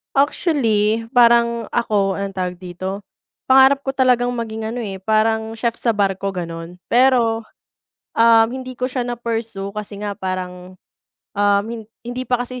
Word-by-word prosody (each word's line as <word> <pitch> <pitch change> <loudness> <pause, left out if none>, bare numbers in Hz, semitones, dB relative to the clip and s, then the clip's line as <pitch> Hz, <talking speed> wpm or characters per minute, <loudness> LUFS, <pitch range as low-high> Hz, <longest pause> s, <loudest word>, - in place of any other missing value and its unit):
Actually, 230 - +1
parang 235 -1 +4
ako, 205 -4 +1
anong 195 -1 -5
tawag 180 -1 -2
dito? 185 +2 -5 0.5
Pangarap 265 +1 +6
ko 270 - -4
talagang 250 -2 +2
maging 225 -2 -4
ano, 235 - -5
eh, 195 -5 -5
parang 220 +2 +1
chef 230 0 0
sa 235 - -2
barko 195 -2 0
gano'n. 170 -1 -6
Pero, 240 -2 +3 0.7
um, 225 -1 +6
hindi 255 +1 -6
ko 255 - 0
siya 250 -1 -2
na-pursue 225 -4 -4
kasi 210 -1 -6
nga 205 -1 -4
parang, 185 -1 -6 0.5
um, 205 0 +2 0.4
hindi 245 +1 -4
pa 245 -1 +1
kasi 250 0 -7
225 Hz, 145 wpm, -20 LUFS, 195-245 Hz, 0.7 s, Pangarap